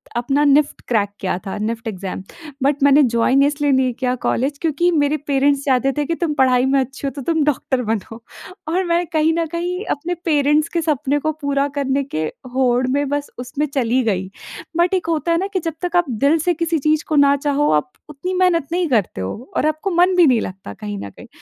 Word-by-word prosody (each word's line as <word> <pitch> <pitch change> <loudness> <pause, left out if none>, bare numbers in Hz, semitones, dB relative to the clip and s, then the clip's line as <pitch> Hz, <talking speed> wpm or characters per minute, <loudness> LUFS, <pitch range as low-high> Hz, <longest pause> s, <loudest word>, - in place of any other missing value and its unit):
अपना 275 +5 +1
NIFT 285 +1 +3
crack 210 -4 +1
किया 185 -2 -1
था, 195 - -4
निफ्ट 225 +2 -3
एग्ज़ाम। 190 -2 -5 0.4
बट 280 0 +1
मैंने 285 +1 +6
जॉइन 245 +2 +2
इसलिए 290 0 +1
नहीं 260 -2 +2
किया 250 +1 -1
कॉलेज 275 +4 0
क्योंकि 330 +2 +1
मेरे 300 -1 +1
पेरेंट्स 280 0 +2
चाहते 270 0 +2
थे 295 - 0
कि 335 - -1
तुम 330 -3 -1
पढ़ाई 255 -1 +3
में 270 +1 +2
अच्छी 270 +2 -4
हो 275 - -2
तो 280 - -5
तुम 320 +2 +1
डॉक्टर 265 -3 0
बनो 225 +1 -3 0.5
और 365 +3 +1
मैं 345 +1 +1
कहीं 315 +1 +3
न 335 - +1
कहीं 355 +3 -3
अपने 325 +5 -2
पेरेंट्स 300 0 +2
के 335 - +1
सपने 290 -2 0
को 310 +2 -1
पूरा 280 0 0
करने 280 0 0
के 160 - -3 0.3
होड़ 255 -1 +2
में 285 +1 0
बस 290 0 -2
उसमें 255 +4 -2
चली 255 -1 +2
गई। 190 -4 -1 0.5
बट 345 +2 +2
एक 365 -3 0
होता 330 +1 0
है 335 - +3
ना 385 +3 -1
कि 375 - +1
जब 330 -2 -3
तक 355 0 -3
आप 350 -5 +2
दिल 280 +7 +2
से 350 +3 +1
किसी 335 -1 -1
चीज़ 310 +1 +2
को 310 - -1
ना 280 -1 +5
चाहो 290 +1 +1
आप 150 0 +1 0.2
उतनी 300 +6 -5
मेहनत 360 -5 +2
नहीं 350 0 0
करते 210 - 0
हो 210 - -6
और - - +1
आपको 310 +5 -2
मन 360 +2 +3
भी 355 -2 +6
नहीं 245 -4 +3
लगता 185 - -7
कहीं 105 0 -6
न 100 - -6
कहीं। - - -14
285 Hz, 220 wpm, -19 LUFS, 250-320 Hz, 0.5 s, मैंने